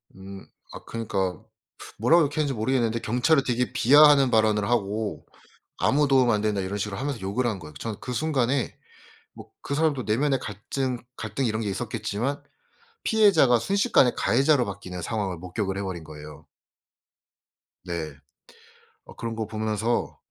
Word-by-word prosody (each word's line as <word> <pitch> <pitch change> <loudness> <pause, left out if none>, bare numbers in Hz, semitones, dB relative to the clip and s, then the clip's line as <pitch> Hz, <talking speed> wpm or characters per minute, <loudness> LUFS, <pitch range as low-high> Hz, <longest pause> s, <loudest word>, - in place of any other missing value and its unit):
음. 95 0 -10 0.3
아 - - -10
그니까 95 -6 -2 0.6
뭐라고 165 +9 +5
욕했는지 145 -1 -1
모르겠는데 115 -1 0
경찰을 130 +7 +2
되게 125 -1 -1
비하하는 145 0 +6
발언을 110 -2 +2
하고 110 -2 -1 0.5
"아무 145 +1 +2
도움 130 -3 +4
안 105 - +2
된다." 105 -1 0
이런 95 +2 -3
식으로 100 -1 -4
하면서 135 -3 -3
욕을 100 +7 -1
한 110 -5 -1
거예요. 75 -3 -11
저는 110 +3 -6
그 125 - -5
순간에 130 -1 0 0.6
뭐 - - -13
그 140 - -3
사람도 150 -4 +1
내면의 135 +5 +1
갈증 125 +5 -4 0.2
갈등 110 +5 -3
이런 110 -1 -1
게 105 - -2
있었겠지만 115 +7 -3 0.6
피해자가 190 - +4
순식간에 195 - +3
가해자로 135 +2 +3
바뀌는 95 -3 -7
상황을 100 -3 -2
목격을 95 +3 -4
해 - - -2
버린 90 -4 -5
거예요. 75 0 -11 1.4
네. 80 -4 -4 0.9
어 - - -14
그런 115 -1 -5
거 110 -1 -3
보면서 110 +1 -2
115 Hz, 335 characters per minute, -25 LUFS, 100-135 Hz, 1.4 s, 비하하는